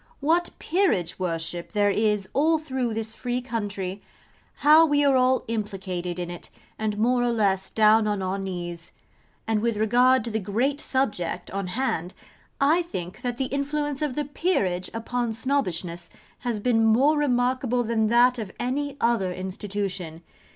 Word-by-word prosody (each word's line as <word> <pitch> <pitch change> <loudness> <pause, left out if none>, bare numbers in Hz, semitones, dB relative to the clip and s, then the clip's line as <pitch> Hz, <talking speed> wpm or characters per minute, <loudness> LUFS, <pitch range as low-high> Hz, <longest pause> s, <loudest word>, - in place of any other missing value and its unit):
What 330 +5 +2
Peerageworship 175 - -1
there 205 -1 +3
is 210 -2 +1
all 315 +4 +3
through 260 -7 -3
this 220 0 -3
free 245 0 -2
country! 205 -6 -4 0.6
How 310 +2 +8
we 290 -2 +3
are 275 -1 +4
all 255 0 +3
implicated 190 -5 -3
in 175 -1 -4
it, 175 - -9 0.3
and 215 -1 -1
more 245 +3 +2
or 245 - +2
less 195 -4 +1
down 215 0 +4
on 205 -1 0
our 190 +1 -2
knees. 175 -3 -6 0.5
And 220 -1 +1
with 230 -1 0
regard 245 +3 +4
to 230 - -3
the 220 - 0
great 240 +9 -1
subject 205 -10 -2
on 195 -1 -3
hand, 180 -5 -2 0.4
I 305 +5 +4
think 185 - -6
that 245 -2 -3
the 265 - 0
influence 290 0 -2
of 295 -4 -1
the 295 - -1
Peerage 200 - -1
upon 230 +1 -2
Snobbishness 180 - -2 0.3
has 235 -3 -2
been 225 0 +2
more 255 +8 +4
remarkable 250 -3 +1
than 220 -1 +1
that 240 +2 +4
of 210 -4 -5
any 280 +3 -2
other 230 -7 +1
institution. 185 -2 -4
225 Hz, 155 wpm, -25 LUFS, 190-260 Hz, 0.6 s, How